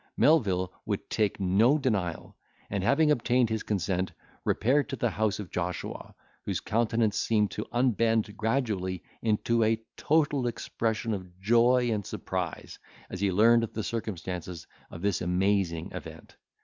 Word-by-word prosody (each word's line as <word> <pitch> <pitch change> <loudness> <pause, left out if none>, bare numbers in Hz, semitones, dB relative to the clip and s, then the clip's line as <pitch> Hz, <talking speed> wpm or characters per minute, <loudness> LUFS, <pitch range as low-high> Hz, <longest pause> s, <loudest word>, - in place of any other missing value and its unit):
Melvil 95 - +3
would - - -3
take 105 -2 0
no 100 +9 +4
denial, 100 - -2 0.4
and 100 -2 -1
having 150 +7 +4
obtained 120 -3 +2
his 110 -1 -1
consent, 95 -2 -1 0.3
repaired 140 +6 +2
to - - -2
the 120 -2 0
house 105 +2 0
of 105 -4 -7
Joshua, 90 0 -4 0.3
whose - - -2
countenance 115 -1 +1
seemed 105 -4 +1
to 105 - -5
unbend 115 -3 +1
gradually 110 -6 -1 0.2
into 115 +1 +1
a 110 +1 +2 0.2
total 145 -4 +2
expression 115 -1 -2
of 90 -2 -7
joy 120 +4 +4
and 105 -2 -1
surprise, 90 -3 -5 0.3
as 95 - -5
he 100 -1 +2
learned 115 +5 +5
the 110 -1 -3
circumstances 90 -6 -5 0.2
of 85 - -9
this 100 -3 +1
amazing 90 -2 0
event. - - -9
110 Hz, 140 wpm, -28 LUFS, 95-115 Hz, 0.4 s, learned